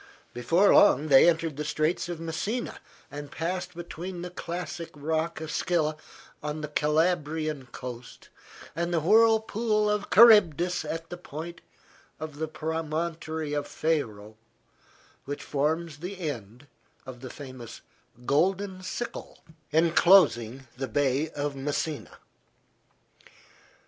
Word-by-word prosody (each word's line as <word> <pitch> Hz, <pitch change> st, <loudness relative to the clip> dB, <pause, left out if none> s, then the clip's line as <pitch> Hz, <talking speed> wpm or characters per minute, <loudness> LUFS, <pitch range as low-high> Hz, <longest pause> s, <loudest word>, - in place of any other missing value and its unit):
Before 165 Hz, +12 st, +3 dB
long 155 Hz, -6 st, +5 dB
they 135 Hz, +4 st, +8 dB
entered 165 Hz, -3 st, -1 dB
the 150 Hz, -, -2 dB
Straits 155 Hz, +4 st, -1 dB
of 175 Hz, -2 st, -4 dB
Messina 170 Hz, +9 st, -3 dB, 0.3 s
and 145 Hz, 0 st, -7 dB
passed 180 Hz, +2 st, -3 dB
between 175 Hz, +1 st, -6 dB
the 180 Hz, -, -6 dB
classic 170 Hz, -1 st, -5 dB
rock 160 Hz, +3 st, -2 dB
of 160 Hz, -1 st, -5 dB
Scylla 155 Hz, -3 st, 0 dB, 0.5 s
on 150 Hz, +1 st, -4 dB
the 150 Hz, -, -3 dB
Calabrian 155 Hz, -2 st, 0 dB
coast, 120 Hz, 0 st, -9 dB, 0.5 s
and 170 Hz, +2 st, -1 dB
the 170 Hz, -, +2 dB
whirlpool 220 Hz, +2 st, +3 dB
of 210 Hz, -1 st, -2 dB
Charybdis 180 Hz, -6 st, +6 dB
at 165 Hz, +2 st, -5 dB
the 175 Hz, -, -5 dB
point 170 Hz, +1 st, -8 dB, 0.6 s
of 155 Hz, -1 st, -7 dB
the 160 Hz, -, -1 dB
promontory 160 Hz, 0 st, -3 dB
of 145 Hz, -1 st, -2 dB
Faro, 110 Hz, -10 st, -2 dB, 0.9 s
which 145 Hz, +1 st, -5 dB
forms 155 Hz, +2 st, -1 dB
the 185 Hz, +3 st, -6 dB
end 125 Hz, -, -6 dB, 0.4 s
of 130 Hz, -2 st, -9 dB
the 130 Hz, -, -7 dB
famous 130 Hz, -5 st, -10 dB, 0.4 s
"Golden 185 Hz, +6 st, +1 dB
Sickle" 190 Hz, +6 st, -6 dB, 0.3 s
enclosing 155 Hz, -, +4 dB
the 135 Hz, 0 st, -3 dB
Bay 140 Hz, +5 st, +1 dB
of 145 Hz, -1 st, -3 dB
Messina. 145 Hz, +2 st, -3 dB
160 Hz, 120 wpm, -27 LUFS, 145-175 Hz, 0.9 s, they